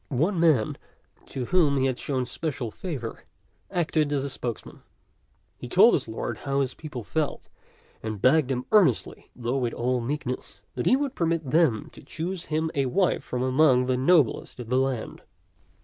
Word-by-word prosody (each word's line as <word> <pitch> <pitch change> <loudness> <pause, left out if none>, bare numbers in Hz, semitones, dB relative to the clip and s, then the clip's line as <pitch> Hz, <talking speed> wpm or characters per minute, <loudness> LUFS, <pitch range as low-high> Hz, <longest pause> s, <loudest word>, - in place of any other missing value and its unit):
One 165 +8 0
man 155 -10 +3 0.5
to 130 -2 -4
whom 155 -3 +3
he 135 - +2
had 130 -2 -1
shown 130 -3 -1
special 125 -3 -4
favor 130 - -6 0.5
acted 155 -5 0
as 140 -1 -1
spokesman. 120 -4 -6 0.8
He - - -7
told - - +6
his - - 0
lord - - -4
how 140 0 0
the 130 - -8
people 145 -7 -7
felt, 155 +7 -3 0.5
and 110 -2 -4
begged 135 +4 +4
him 125 -1 -2
earnestly, 190 - +2
though 120 +2 -2
with 120 -3 -1
all 125 +1 0
meekness, 130 0 -4
that 125 - -2
he 255 - +6
would 275 -1 -1
permit 165 -5 -1
them 155 -9 +2
to - - -13
choose 170 +5 -5
him 160 +1 -1
a 135 -2 0
wife 185 +8 +1
from 125 0 -3
among 130 -1 +4
the 130 0 +1
noblest 135 -2 +2
of 120 -2 -7
the 130 +1 +2
land. 130 -4 -2
135 Hz, 170 wpm, -26 LUFS, 125-160 Hz, 0.8 s, told